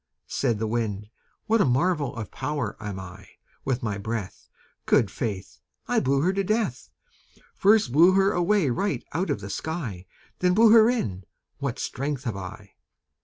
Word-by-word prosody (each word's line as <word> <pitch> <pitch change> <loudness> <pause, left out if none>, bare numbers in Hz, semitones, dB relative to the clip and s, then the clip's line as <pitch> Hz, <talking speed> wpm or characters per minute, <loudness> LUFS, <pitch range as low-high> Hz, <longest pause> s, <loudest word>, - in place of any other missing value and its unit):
Said 120 -5 0
the 110 - -2
Wind 105 -2 -2 0.3
"What 225 0 +3
a - - +4
marvel 145 +2 +1
of 110 -3 -6
power 150 -1 -3
am 105 -3 -5
I! 90 -2 -10 0.4
With 130 -2 -1
my 105 -3 -2
breath, 110 -1 -5 0.4
Good 100 -4 +3
faith! 100 -6 -5 0.3
I - - +2
blew 135 +1 +1
her 180 +5 +2
to 195 0 0
death 215 +3 -1 0.6
First 205 - +3
blew 170 +7 +6
her 195 +1 +4
away 175 -5 +2
right 195 +12 -1
out 185 +4 -1
of 100 - -1
the 100 - -7
sky 115 - -5 0.3
Then 180 0 +2
blew 225 +1 +6
her 225 0 +7
in; 100 - -2 0.3
what 140 -4 -3
strength 140 0 -3
have 115 -7 -3
I!" 100 +1 -8
135 Hz, 170 wpm, -25 LUFS, -, 0.6 s, her